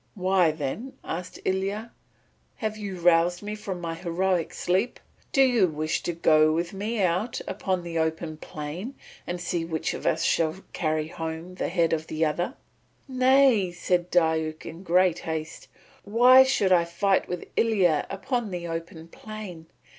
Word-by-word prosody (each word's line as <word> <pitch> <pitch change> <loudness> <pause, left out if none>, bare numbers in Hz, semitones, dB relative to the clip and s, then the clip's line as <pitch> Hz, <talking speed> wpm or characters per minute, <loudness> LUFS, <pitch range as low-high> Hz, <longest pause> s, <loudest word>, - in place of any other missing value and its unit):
"Why, 185 -2 +3
then," 155 - -4
asked 175 +2 -6
Ilya, 195 +4 -1 0.6
"have 215 -1 -3
you 200 -4 -6
roused 175 +1 +3
me 210 +1 -4
from 200 -4 -5
my 165 -1 -4
heroic 175 0 -1
sleep. 190 +7 -1 0.3
Do 270 - +5
you 240 -7 +4
wish 155 -1 -2
to - - -2
go 155 -2 +4
with 170 +3 -1
me 210 +2 -2
out 185 +7 0
upon 185 -1 -2
the 165 -1 -3
open 160 0 -2
plain 155 - -7 0.3
and 175 0 -3
see 175 -1 -2
which 160 -1 -2
of - - -4
us - - +1
shall 160 0 +2 0.2
carry 155 -2 -1
home 165 +2 -6
the 180 - -3
head 170 -2 +1
of 160 0 -2
the 160 +1 0
other?" 175 - -1 0.5
"Nay," 255 -6 +4
said 175 0 -1
Diuk 160 -2 +1
in 165 +2 -8
great 180 -1 +3
haste. 160 -1 -5 0.4
"Why 245 +5 +7
should 265 -8 +2
I 175 -2 +5
fight 190 +3 +1
with 180 -1 -5
Ilya 190 -9 +2
upon 235 +3 -2
the 175 -2 -5
open 165 0 -6
plain? 190 -4 -9
175 Hz, 160 wpm, -26 LUFS, 165-200 Hz, 0.6 s, Why